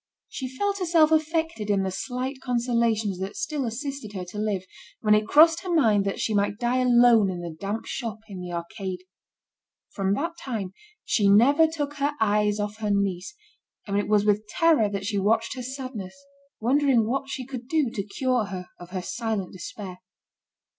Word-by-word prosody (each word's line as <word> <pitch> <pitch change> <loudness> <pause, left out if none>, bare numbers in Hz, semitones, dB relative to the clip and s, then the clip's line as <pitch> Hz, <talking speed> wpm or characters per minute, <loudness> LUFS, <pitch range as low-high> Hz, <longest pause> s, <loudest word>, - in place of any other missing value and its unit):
She 260 - -5
felt 400 +10 -2
herself 330 -3 +4
affected 320 -7 0
in 200 -2 +2
the 190 - -2
slight 255 +6 -4
consolations 235 -5 0
that 190 +2 -4
still 300 - -2
assisted 255 -2 -5
her 185 -2 -5
to 210 - -6
live, 210 -3 -1 0.4
when 210 -1 +4
it 210 0 +3
crossed 325 +5 +6
her 370 - -4
mind 220 -12 +3
that 195 - -2
she 220 - 0
might 205 0 +1
die 240 +1 0
alone 240 -4 +5
in 180 -2 -4
the 170 -2 -6
damp 205 +3 -3
shop 225 -3 -4
in 190 -4 -8
the 180 -1 -6
arcade. 180 +2 -5 0.9
From 195 -1 0
that 335 +9 -2
time, 210 -8 -4 0.3
she 205 -3 +3
never 280 +10 +6
took 290 -2 -4
her 285 +1 0
eyes 210 -1 +2
off 205 +1 -3
her 215 -1 -2
niece, 200 - -1 0.5
and 200 - -3
it 205 - +1
was 210 -1 +3
with 210 0 +2
terror 315 - +3
that 200 -1 -4
she 205 -1 0
watched 225 +3 +1
her 255 - -6
sadness, 255 -6 -6 0.4
wondering 255 -1 +3
what 270 +3 -2
she 260 -2 -4
could 250 -2 -7
do 295 -4 +1
to 200 - -3
cure 245 +3 0
her 185 -3 -7
of 175 0 -11
her 185 -1 -4
silent 220 -3 -3
despair. 185 0 -8
220 Hz, 185 wpm, -25 LUFS, 200-270 Hz, 0.9 s, crossed